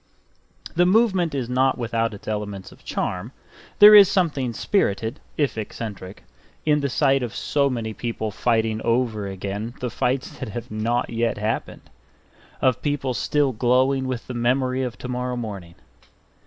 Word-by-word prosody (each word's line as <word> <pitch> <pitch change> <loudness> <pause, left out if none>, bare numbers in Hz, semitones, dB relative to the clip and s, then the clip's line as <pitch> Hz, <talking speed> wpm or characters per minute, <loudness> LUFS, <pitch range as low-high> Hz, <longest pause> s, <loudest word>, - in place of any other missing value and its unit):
The 175 +1 +4
movement 190 -6 +3
is 130 -4 -2
not 130 +2 +2
without 115 -2 -1
its 100 - -14
elements 105 -3 -4
of - - -18
charm; 95 +8 -3 0.4
there 210 +1 +10
is 200 -3 +9
something 150 -10 0
spirited, 115 - 0 0.2
if 130 -8 0
eccentric, 105 -3 -7 0.4
in 150 -1 +3
the 140 -1 -1
sight 135 +1 +2
of 120 -2 -4
so 140 -1 +1
many 115 -4 -3
people 110 -1 -4
fighting 110 0 0
over 115 -4 0
again 100 +4 -5
the 125 -2 -3
fights 130 +1 -2
that - - -5
have 115 +1 -7
not 115 +3 -1
yet 115 0 0
happened; 110 +2 -3 0.8
of 130 -2 +2
people 145 -3 -1
still 145 +3 +1
glowing 130 +3 +2
with 125 -3 -4
the 125 - -6
memory 130 +2 +1
of 125 -2 -3
tomorrow 125 0 -3
morning. 100 -8 -6
120 Hz, 155 wpm, -23 LUFS, 110-135 Hz, 0.8 s, there